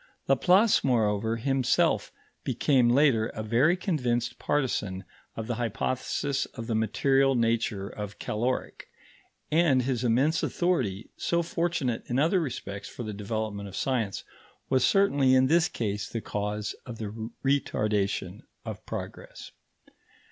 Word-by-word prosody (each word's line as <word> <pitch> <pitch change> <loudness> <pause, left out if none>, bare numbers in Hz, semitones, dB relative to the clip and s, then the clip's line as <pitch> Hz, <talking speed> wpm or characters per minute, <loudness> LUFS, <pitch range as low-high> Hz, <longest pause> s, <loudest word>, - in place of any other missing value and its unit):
Laplace, 200 +5 +4
moreover, 110 -3 +1
himself 135 +2 +1 0.3
became 130 -5 +2
later 125 -4 +4
a 110 - -4
very 125 +11 +3
convinced 125 - -1
partisan 105 -10 -1 0.3
of 115 - -4
the 120 - -2
hypothesis 130 +4 -1
of 115 - -6
the 115 - -2
material 135 +5 +2
nature 115 -4 0
of 105 0 -7
caloric, 120 +4 -3 0.6
and 150 -5 +4
his 125 -1 -1
immense 135 +7 +2
authority, 125 - -1
so 170 0 0
fortunate 165 -8 -1
in 120 - -1
other 165 +7 +3
respects 100 - -5
for 120 - -7
the 110 -1 -5
development 105 0 -4
of 95 - -10
science, 115 -7 -1 0.5
was 130 -1 +3
certainly 145 -10 +4
in 130 0 +5
this 165 +5 +3
case 105 -3 -3
the 115 - -3
cause 105 0 -3
of 120 -3 -8
the 110 +1 -5 0.2
retardation 105 -8 0 0.2
of - - -6
progress. - - -7
120 Hz, 130 wpm, -28 LUFS, 105-140 Hz, 0.6 s, in